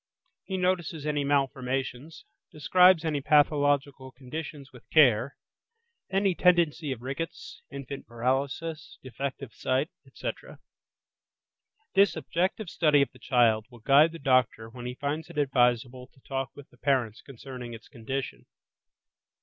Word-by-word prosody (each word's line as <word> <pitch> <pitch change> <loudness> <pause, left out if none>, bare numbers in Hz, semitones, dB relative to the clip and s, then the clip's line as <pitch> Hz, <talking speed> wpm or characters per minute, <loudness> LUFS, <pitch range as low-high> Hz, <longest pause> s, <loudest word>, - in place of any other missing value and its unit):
He 190 - -3
notices 175 -4 -1
any 150 -1 0
malformations; 135 0 -2 0.3
describes 180 +3 +4
any 150 -3 -1
pathological 145 -2 +2
conditions 140 +2 -8
with 125 - -16
care 135 -3 +4 0.7
(any 195 0 +2
tendency 170 -4 +2
of 120 -2 -6
rickets, 135 +6 -6
infant 140 0 -8
paralysis, 140 +6 -2
defective 130 -1 -6
sight, 130 +5 -1 0.2
etc.). - - -7 1.4
This 200 +1 +4
objective 175 +7 -2
study 150 -4 +4
of - - -6
the 125 - -18
child 115 -4 +2
will 120 - -14
guide 145 +6 +5
the 165 - -8
doctor 130 -5 +1
when 120 0 -8
he 125 - -5
finds 145 +3 -3
it - - -11
advisable 125 -2 +1
to - - -22
talk 135 -1 -3
with 145 -1 -13
the - - -22
parents 125 -6 0
concerning 125 -2 -9
its 110 - -14
condition. 130 +2 -6
140 Hz, 130 wpm, -28 LUFS, 125-155 Hz, 1.4 s, guide